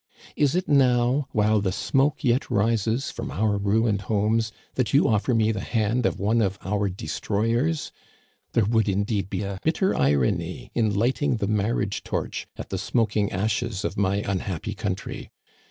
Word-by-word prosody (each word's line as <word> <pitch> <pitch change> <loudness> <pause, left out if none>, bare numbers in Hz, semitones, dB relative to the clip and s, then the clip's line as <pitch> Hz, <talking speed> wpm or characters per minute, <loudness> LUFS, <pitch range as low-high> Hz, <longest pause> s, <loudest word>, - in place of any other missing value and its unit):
Is 145 +1 +2
it 180 - 0
now, 130 0 +3
while 105 0 +2
the 95 -2 0
smoke 140 - +1
yet 125 -1 +1
rises 115 +4 +1
from - - -6
our 100 +9 0
ruined 105 +1 +1
homes, 110 +1 +1 0.2
that 130 -1 0
you 140 - +5
offer 110 +3 +1
me 110 -1 +3
the 105 - -3
hand 115 +3 0
of - - -3
one 110 +4 +2
of 100 -2 0
our 100 +1 0
destroyers? 115 - -1 0.6
There 115 - +3
would, 110 0 +2
indeed, 100 0 -1
be - - -2
a 100 -1 -4
bitter 180 +4 +1
irony 70 -2 0
in 110 -4 +1
lighting 130 +4 +1
the 105 - -1
marriage 105 0 -1
torch - - -3
at - - -7
the - - -3
smoking 105 -3 0
ashes 105 +1 -1
of - - -2
my 100 +1 +1
unhappy 95 -3 -3
country! - - -4
110 Hz, 165 wpm, -25 LUFS, 100-120 Hz, 0.6 s, you